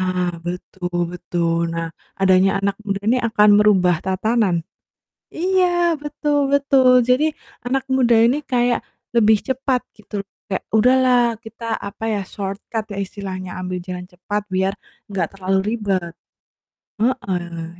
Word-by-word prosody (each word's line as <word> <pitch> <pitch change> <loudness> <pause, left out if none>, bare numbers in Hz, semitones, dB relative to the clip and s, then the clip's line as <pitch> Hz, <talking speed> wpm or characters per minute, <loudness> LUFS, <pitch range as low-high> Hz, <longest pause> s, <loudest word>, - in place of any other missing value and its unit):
Nah, 180 -1 0
betul 175 -1 -3
betul. 170 -1 -1
Nah, 165 0 -3 0.3
adanya 190 0 +4
anak 200 0 0
muda 200 -1 -2
ini 255 - +4
akan 215 -2 +3
merubah 185 -5 +4
tatanan. 190 -3 +1 0.7
Iya, 370 +2 +2 0.3
betul 290 -1 0
betul. 260 -3 +5
Jadi, 255 +5 +3 0.4
anak 265 +1 0
muda 245 -3 +4
ini 240 +6 +4
kayak 245 -2 +2 0.4
lebih 220 -2 +5
cepat, 260 -1 0 0.2
gitu. 205 -1 -6 0.2
Kayak, 190 - -2
"Udahlah 245 0 +4
kita 225 0 -4
apa 200 +2 -6
ya, 200 -2 -1
shortcut 205 +2 -5
ya - - -4
istilahnya, 185 -2 -6
ambil 180 0 -3
jalan 180 -1 -6
cepat, 205 +4 -3
biar 190 +1 +1 0.4
enggak 195 - 0
terlalu 190 0 0 0.2
ribet." 190 -6 -2 0.9
Heeh. 175 -8 -2
200 Hz, 130 wpm, -20 LUFS, 185-240 Hz, 0.9 s, betul